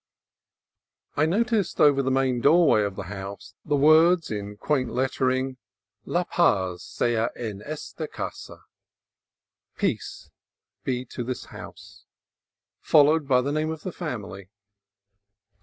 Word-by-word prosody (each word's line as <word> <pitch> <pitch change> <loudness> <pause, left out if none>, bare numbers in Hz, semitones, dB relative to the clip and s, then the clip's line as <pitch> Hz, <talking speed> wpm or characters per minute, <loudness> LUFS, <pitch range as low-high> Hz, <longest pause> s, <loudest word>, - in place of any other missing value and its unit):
I 155 +2 +2
noticed 215 +1 0
over 145 -2 +5
the 130 - -1
main 130 -2 +1
doorway 155 -6 +5
of 100 -2 -2
the - - -5
house 100 +1 -8
the 150 - 0
words, 160 +3 +5
in 105 -1 -5
quaint 130 0 0
lettering, 130 0 0 0.2
" 105 +1 -52
La 175 - +3
paz 95 - +1
sea 115 -1 0
en 105 -4 -6
esta 150 +4 -6
casa" - - -7 1.1
(Peace - - -3 0.5
be 125 -1 -2
to 120 - -6
this 125 +1 -5
house), - - -12 0.7
followed 150 0 +4
by 125 -2 +4
the 140 +3 -2
name 155 +1 -1
of 160 -1 -6
the 185 - -4
family. 105 - -6
130 Hz, 125 wpm, -25 LUFS, 105-155 Hz, 1.1 s, over